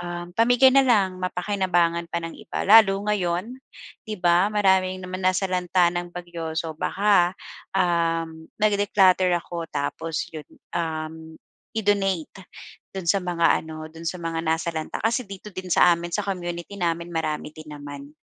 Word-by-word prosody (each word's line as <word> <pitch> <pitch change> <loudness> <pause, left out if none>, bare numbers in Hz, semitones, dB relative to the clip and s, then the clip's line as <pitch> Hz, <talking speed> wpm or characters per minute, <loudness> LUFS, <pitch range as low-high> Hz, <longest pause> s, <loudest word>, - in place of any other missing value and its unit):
um, 175 0 -6
pamigay 245 +4 +5
na 275 - +8
lang, 195 -6 +2
mapakinabangan 180 -3 0
pa - - -1
ng 165 - -5
iba. - - -4
Lalo 200 -2 +7
ngayon, 195 +3 -1 0.5
'di 215 - -3
ba, 175 +2 +4
maraming 190 -3 +2
naman 185 +1 -5
nasalanta 185 -1 +2
ng 175 0 -3
bagyo. 170 -2 -6
So, 165 -1 -2
baka, 185 +1 +2 0.4
um, 165 -3 0
nag-declutter 200 -3 +3
ako 170 -1 -6
tapos 155 +2 -3
'yon, 155 -2 -8 0.3
um, 160 -1 -4 0.4
i-donate 195 -4 -1 0.5
do'n 185 -3 -5
sa 195 +3 +2
mga 170 -2 +2
ano, 155 0 -8
do'n 165 0 -11
sa 180 - -4
mga 165 -1 -2
nasalanta. 160 0 -2
Kasi 230 +4 0
dito 200 +1 -9
din 185 -1 -7
sa 175 0 +6
amin, 170 +1 -6
sa 210 +4 -1
community 175 -1 -4
namin, 170 0 -1
marami 155 -2 -3
din 155 -1 -11
naman. 145 -1 -9
175 Hz, 150 wpm, -24 LUFS, 165-195 Hz, 0.5 s, na